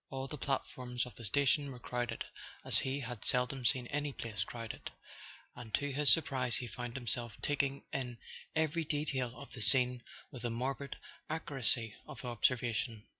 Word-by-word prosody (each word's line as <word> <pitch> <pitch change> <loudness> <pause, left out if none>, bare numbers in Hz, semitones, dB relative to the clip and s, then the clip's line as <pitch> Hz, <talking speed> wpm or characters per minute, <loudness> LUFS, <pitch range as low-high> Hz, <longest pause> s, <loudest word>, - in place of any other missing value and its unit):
All 135 -1 -3
the 150 - -5
platforms 125 -3 -1
of 125 - -9
the 115 - -6
station 140 +4 +3
were 125 - -7
crowded 120 -1 -2 0.4
as - - +5
he 135 +2 -1
had 120 -4 -5
seldom 125 +1 +2
seen 120 +2 +4
any 145 0 0
place 110 -6 -2
crowded, 115 +2 -6 0.7
and 120 -3 -8
to 145 0 -1
his 145 +1 +5
sur¬ 165 - +7
prise 125 -3 +1
he 130 - -1
found 120 +2 -5
himself 120 -2 -2
taking 140 -1 +1
in 125 -3 -2 0.4
every 160 +1 +2
detail 145 -5 0
of 140 - -9
the 125 - -7
scene 125 +1 +5 0.3
with 125 - -8
a 120 - +1
morbid 135 +4 -2 0.3
accuracy 135 -8 0
of 125 - -8
observation. 120 -2 +1
125 Hz, 170 wpm, -35 LUFS, 120-140 Hz, 0.7 s, sur¬